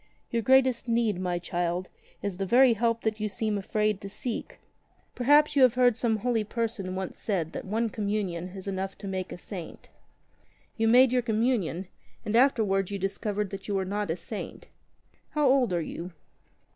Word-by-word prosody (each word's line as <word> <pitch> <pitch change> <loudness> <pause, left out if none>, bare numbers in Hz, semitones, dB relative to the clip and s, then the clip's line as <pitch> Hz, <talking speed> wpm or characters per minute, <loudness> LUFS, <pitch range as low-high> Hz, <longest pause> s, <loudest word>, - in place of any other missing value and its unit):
"Your 235 - +1
greatest 260 0 +3
need, 230 -5 +1
my 180 -1 -1
child, 175 +1 -2 0.3
is 200 -3 -3
the 195 - -1
very 250 +3 +6
help 230 +1 0
that 220 -1 -1
you 215 0 -1
seem 215 +1 -1
afraid 210 +1 0
to 200 - -7
seek. 230 +4 -5 0.6
Perhaps 290 +4 +4
you 280 - +4
heard 245 0 +3
that - - -14
some 225 -2 +1
holy 230 0 0
person 215 -4 -3
once 190 -1 -5
said 175 -7 -1
that - - -6
one 225 +4 0
Communion 200 -5 -2
is 190 +1 -9
enough 195 0 -3
to 200 - -8
make 185 -1 -3
a - - -6
saint. 180 -2 -9 0.9
You 225 0 +1
made 250 +2 +6
your 250 - +3
Communion, 220 -6 0 0.4
and 210 - -1
afterwards 215 -7 +3
you 200 - -3
discovered 200 +1 -2
that 195 -1 -7
you 205 - -1
were 190 -1 0
not 205 0 -2
a 165 - -1
saint. 205 +5 -7 0.7
How 300 -2 +3
old 255 -5 +3
are 170 -2 0
you 175 +3 -6
210 Hz, 185 wpm, -28 LUFS, 190-235 Hz, 0.9 s, very